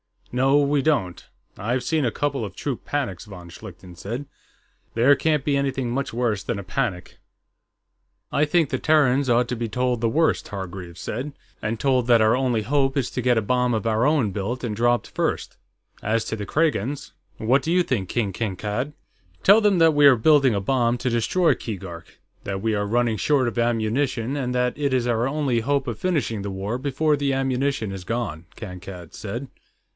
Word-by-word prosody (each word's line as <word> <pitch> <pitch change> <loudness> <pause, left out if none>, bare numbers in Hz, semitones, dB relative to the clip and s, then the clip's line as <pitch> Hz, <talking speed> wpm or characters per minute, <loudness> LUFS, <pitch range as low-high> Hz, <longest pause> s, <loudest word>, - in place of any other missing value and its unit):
"No, 135 +3 +4
we 140 0 +2
don't. 130 - 0 0.3
I've 120 +5 -1
seen 155 0 +1
a 120 - +1
couple 140 -4 -1
of 95 -2 -9
troop 135 0 -4
panics," 115 -11 -3
von 90 -4 -11
Schlichten 90 -1 -11
said. 115 +10 -5 0.7
"There 120 +5 +5
can't 150 +1 +1
be 140 -1 +1
anything 135 -3 -1
much 135 +3 -2
worse 115 -4 0
than 110 - -3
a 100 - -5
panic." 90 0 -3 1.1
"I 150 - +2
think 155 -1 +2
the - - -2
Terrans 140 -4 +3
ought 120 0 +3
to 125 - -2
be 115 0 -2
told 125 0 0
the 115 - +2
worst," 160 +6 +1
Hargreaves 95 -3 -7
said. 135 +6 -4 0.3
"And 110 +1 -2
told 130 -3 +2
that 120 -2 +5
our 110 +1 +4
only 125 -4 +1
hope 135 +3 +1
is 130 -3 0
to 125 - -2
get 125 -1 +2
a - - +3
bomb 125 +2 +1
of 110 0 -1
our 115 +3 +2
own 145 -9 +2
built 105 +7 -3
and 115 -3 -2
dropped 120 +2 +1
first. - - -2 0.4
As 110 +2 0
to - - -3
the 105 - -4
Kragans.... 145 -3 0 0.3
What 125 +5 +2
do 160 - -2
you 180 +1 +4
think, 110 - -1
King 105 0 -1
Kankad?" 105 +7 -3 0.5
"Tell 200 +3 +7
them 205 -4 +3
that 165 -1 +5
we 145 -1 +6
are 135 - +7
building 135 0 +4
a 100 - 0
bomb 120 +2 +1
to 125 - -1
destroy 160 +10 +2
Keegark; 95 -6 -8 0.3
that 95 -1 -3
we 110 +1 0
are 105 -1 -1
running 115 0 +1
short 130 - +2
of 120 - -4
ammunition, 120 +3 0
and 125 -2 -2
that 125 0 +1
it 140 -2 0
is 125 -2 +1
our 120 0 +1
only 135 -4 0
hope 140 +3 0
of 120 - -4
finishing 145 - -1
the 100 - -4
war 100 +5 -3
before 145 +3 +1
the 140 -1 0
ammunition 135 -4 -1
is 95 -2 -7
gone," 110 -8 -3
Kankad 90 -4 -9
said. 120 +6 -6
120 Hz, 195 wpm, -23 LUFS, 110-140 Hz, 1.1 s, Tell